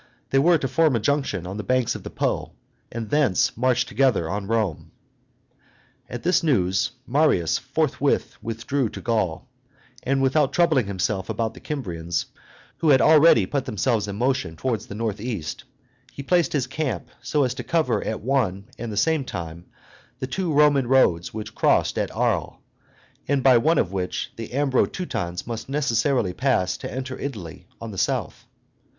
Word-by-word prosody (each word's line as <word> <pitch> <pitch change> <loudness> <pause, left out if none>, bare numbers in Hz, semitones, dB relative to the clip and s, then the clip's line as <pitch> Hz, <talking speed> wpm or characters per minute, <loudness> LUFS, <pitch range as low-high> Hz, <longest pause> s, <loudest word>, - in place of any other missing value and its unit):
They 135 - +4
were 170 +4 +5
to 135 - -2
form 155 +1 +2
a - - +2
junction 110 - -1
on 95 +3 -5
the 105 - -4
banks 130 +2 +1
of - - -7
the - - -7
Po, - - -2 0.4
and 115 -2 -5
thence 145 -11 +2
march 125 +1 +2
together 125 -11 +1
on 100 +2 -3
Rome. 110 -8 -1 1.2
At 120 - -6
this 175 0 +3
news 100 - +1
Marius 120 - +2
returned 140 +2 0
forthwith 140 0 0 0.6
to - - -7
Gaul, 110 -8 -1 0.5
and, 135 +1 0
without 135 +1 +2
troubling 155 - +3
himself 95 0 -2
about 115 -1 -2
the - - -12
Kymrians, 85 - -3 0.5
who 160 - +2
had 135 -2 +6
really 150 - +6
put 135 +5 -2
themselves 110 0 0
in 100 - -4
motion 120 -8 -1
towards 115 +5 -2
the 100 - -7
north 110 -2 -3
east, 105 - -5 0.5
he 140 - -8
placed 175 +3 +2
his 140 -4 +1
camp 135 +2 -3
so 150 -2 +1
as 125 -2 0
to - - -6
cover 130 -11 0
at 110 - -3
one 110 -5 -1
and 115 -1 -4
the 105 - -5
same 160 +6 +2
time 85 -6 -7 0.5
the - - -3
two 170 +6 -2
Roman 145 -3 +4
roads 95 -10 +3
which 110 0 -7
crossed - - +2
at - - -1
Arles, - - -1 0.7
and 140 -2 +1
by 130 -3 +6
one 160 +7 +2
of 90 - +1
which 90 -1 -3
the 115 -1 -6
Ambro 135 -2 +2
Teutons 90 - -4
must 115 +1 -6
necessarily 125 -6 +1
pass 95 -7 +1
to - - -7
enter 130 0 -5
Italy 95 - -7
on 115 -1 -7
the 95 - -5
south. - - -2
125 Hz, 170 wpm, -24 LUFS, 100-140 Hz, 1.2 s, had